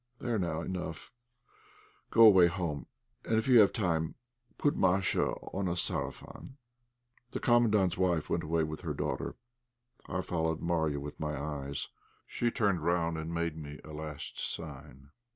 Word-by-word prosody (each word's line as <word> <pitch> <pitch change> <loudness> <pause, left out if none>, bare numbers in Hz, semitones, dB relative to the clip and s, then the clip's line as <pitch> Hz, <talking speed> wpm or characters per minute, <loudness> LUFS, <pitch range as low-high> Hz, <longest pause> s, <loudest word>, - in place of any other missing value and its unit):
"There, 120 -2 -1
now, 85 -3 -1
enough; 90 -3 -5 1.0
go 115 - +6
away 95 -5 +8
home, 85 -5 -3 0.4
and 110 - 0
if 110 - 0
you 125 -3 +7
have 105 - +7
time 80 -6 0 0.4
put 145 - +2
Masha 95 0 +2 0.3
on 95 -1 -1
a 85 - 0
'sarafan.'" 130 +8 -4 0.8
The - - -2
Commandant's 105 -7 +3
wife 90 -4 +1
went - - -1
away 80 +1 +1
with 80 0 -4
her 80 -5 -3
daughter. - - -3 0.7
I 90 - -1
followed 80 -3 -1
Marya 80 -4 0
with 75 +1 -8
my 75 -2 -2
eyes; 70 -1 -4 0.4
she 120 - 0
turned 100 -7 +1
round 85 -1 +1
and 80 +1 -5
made 85 -1 -1
me 75 -2 -8
a 80 - -10
last 75 -1 -6
sign. 70 +2 -6
85 Hz, 150 wpm, -31 LUFS, 80-95 Hz, 1.0 s, away